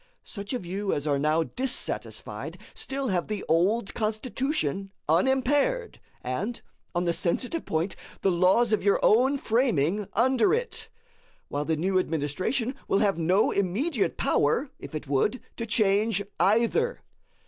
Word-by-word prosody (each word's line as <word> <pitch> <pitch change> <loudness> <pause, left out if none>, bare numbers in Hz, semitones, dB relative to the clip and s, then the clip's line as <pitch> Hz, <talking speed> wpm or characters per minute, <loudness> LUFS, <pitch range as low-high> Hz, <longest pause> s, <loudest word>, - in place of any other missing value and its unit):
Such 200 -2 -7
of 245 -8 -3
you 195 +3 -2
as 145 - -2
are 145 -2 +1
now 155 +3 +2
dissatisfied, 260 +10 -4 0.2
still 270 -1 -3
have 180 -3 0
the 210 -2 -4
old 195 +7 +2
Constitution 215 - -2 0.2
unimpaired, 265 - +2 0.2
and, 190 - -3 0.4
on 175 +1 +1
the 170 - +2
sensitive 250 - -1
point, 165 +4 -1 0.3
the 195 - +3
laws 190 +6 +3
of 215 - +2
your 200 0 +3
own 260 +6 +4
framing 210 - +1
under 255 - +3
it; - - -4 0.6
while 145 +1 -2
the 160 0 0
new 185 +4 +2
administration 185 - -1
will - - +2
have 200 -4 +2
no 180 +5 +3
immediate 200 - 0
power, 235 - +1
if - - -9
it 150 -1 -5
would, 145 - +1 0.2
to 230 - -4
change 210 -1 +2 0.2
either. 235 - +2
205 Hz, 140 wpm, -27 LUFS, 170-250 Hz, 0.6 s, own